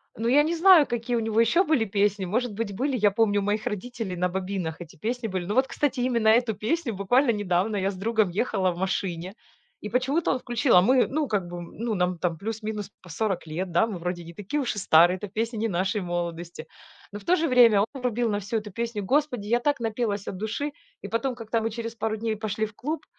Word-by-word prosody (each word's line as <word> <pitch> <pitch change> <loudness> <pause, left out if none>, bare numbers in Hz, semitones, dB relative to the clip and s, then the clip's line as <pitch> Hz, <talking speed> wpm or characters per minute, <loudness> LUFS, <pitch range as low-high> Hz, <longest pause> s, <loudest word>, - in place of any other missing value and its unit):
Ну, 230 - -2
я 285 +5 +5
не 335 +2 -1
знаю, 345 -3 +7
какие 240 +1 -2
у - - +2
него 225 0 0
еще 235 +11 +4
были 300 -10 +2
песни, 200 -1 0
может 230 +4 -1
быть, 205 -2 -4
были, 265 +4 0
я 205 -2 +3
помню 205 -1 +2
у 200 - -2
моих 210 +1 -1
родителей 225 -2 -4
на 180 +1 0
бобинах 185 -3 -4
эти 170 - -10
песни 235 +7 -3
были. 185 -3 -3
Но 205 - -2
вот, 265 +2 +3
кстати, 280 -3 -1
именно 240 -3 +1
эту 225 -1 +3
песню 235 - -1
буквально 235 +7 +3
недавно 205 0 0
я 195 0 0
с - - -9
другом 215 0 +1
ехала 195 -1 0
в 170 - -8
машине, 185 -1 -2 0.5
и 210 - -6
почему-то 265 +8 +1
он 255 - 0
включил, 240 -1 +1
а 180 - +8
мы, 250 +5 +4
ну, 300 +1 -1
как 200 -6 -1
бы, 175 - -7
м, 175 -1 -8
ну, 230 0 -2
нам 180 -2 0
там 170 -1 -1
плюс-минус 215 -1 -4
по 180 - -14
40 190 +2 -2
лет, 175 +4 -4
да, 175 +6 +3
мы 200 -6 -5
вроде 175 0 -4
не 170 - -11
такие 205 - -3
уж 255 -6 -1
и 205 - -3
старые, 175 +1 +5
эта 205 - -6
песня 225 +4 -3
не 225 +1 0
нашей 195 +2 -1
молодости, 175 -1 -4 0.5
но 205 - -6
в 200 - -17
то 360 - +4
же 325 -2 0
время 235 -6 +6
он - - +2 0.2
врубил 245 -1 0
на 205 - 0
всю 215 +3 -2
эту 210 -1 -6
песню, 230 0 -3
господи, 260 -2 0
я 235 +2 +2
так 285 +1 0
напелась 220 -3 -2
от - - -4
души! 220 +8 -3 0.3
И - - -4
потом, 240 +2 -1
как-то 230 -1 -2
мы 225 - -1
через 230 +1 -5
пару 220 -1 -2
дней 220 0 -2
пошли 215 0 -2
в 210 - -10
клуб, 305 +8 -4
215 Hz, 245 wpm, -26 LUFS, 190-240 Hz, 0.5 s, а